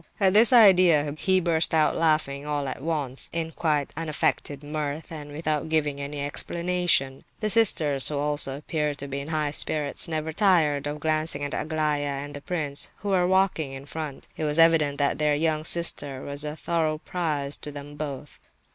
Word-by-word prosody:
At 190 -2 +3
this 220 +4 +7
idea, 180 - +5
he 185 +4 +2
burst 165 -2 +2
out 155 -1 +2
laughing 155 -4 0
all 145 -1 -3
at 130 - -6
once, 145 -4 -3
in 165 -1 -3
quite 150 -4 -1
unaffected 150 -2 -2
mirth, 150 +1 -5
and 150 -2 -8
without 155 0 -2
giving 150 -3 0
any 140 0 -4
explanation. 170 -3 0 0.2
The 215 -1 0
sisters, 155 -11 +4
who 150 - -3
also 145 -2 +1
appeared 150 -1 -3
to 140 - -6
be 140 0 -4
in 140 - -7
high 155 -2 -1
spirits, 150 +1 +1
never 160 -1 -3
tired 155 -8 +2
of 150 +1 -5
glancing 155 -2 +1
at 145 - -4
Aglaya 155 -2 -1 0.2
and 145 +1 -7
the 145 - -8
prince, 150 -4 -1
who 205 - -6
were 180 -2 +2
walking 185 -7 +1
in 135 +1 -9
front. 150 -2 -7
It - - -5
was 150 +1 +1
evident 165 -3 +4
that 145 0 0
their 150 -1 +2
younger 155 0 -1
sister 145 -6 0
was 140 +1 -4
a 150 0 -5
thorough 160 -2 -1
puzzle 155 -4 -3
to 150 - -4
them 145 0 -10
both. 145 -1 -7
150 Hz, 180 wpm, -25 LUFS, 145-165 Hz, 0.2 s, this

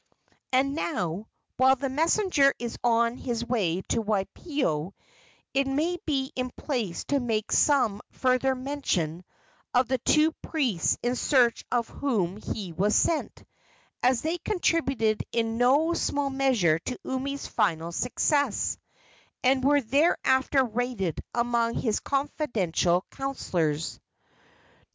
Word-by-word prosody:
And 265 +2 +2
now, 205 - -3 0.3
while 260 +1 +5
the 275 +1 -3
messenger 310 0 +2
is 240 -1 -5
on 235 0 +2
his 235 -3 -3
way 190 -7 0
to 230 - +1
Waipio, 205 - -2 0.6
it 275 0 +2
may 320 +6 0
be 270 -3 0
in 255 0 -2
place 235 - -3
to 285 - +2
make 225 -4 -2
some 245 -9 +3
further 260 +1 +1
mention 255 - -2 0.5
of 250 0 +4
the 260 0 0
two 305 +6 +3
priests 250 - 0
in 245 +1 0
search 245 -3 +2
of 240 -2 +1
whom 205 -10 -1
he 200 -4 -5
was 200 +6 +1
sent, 325 -2 0 0.6
as 250 -1 +2
they 330 +3 -1
contributed 270 - 0
in 225 0 -1
no 285 +7 +4
small 285 -4 -1
measure 245 -13 +2
to 250 +9 -5
Umi's 275 +2 -3
final 165 -3 0
success, 255 - 0 0.6
and 260 0 +3
were 285 +1 +4
thereafter 265 0 +2
rated 235 - -2
among 235 -1 +1
his 220 -4 0
confidential 210 - 0
counsellors. 170 - -2
250 Hz, 125 wpm, -27 LUFS, 215-275 Hz, 0.6 s, while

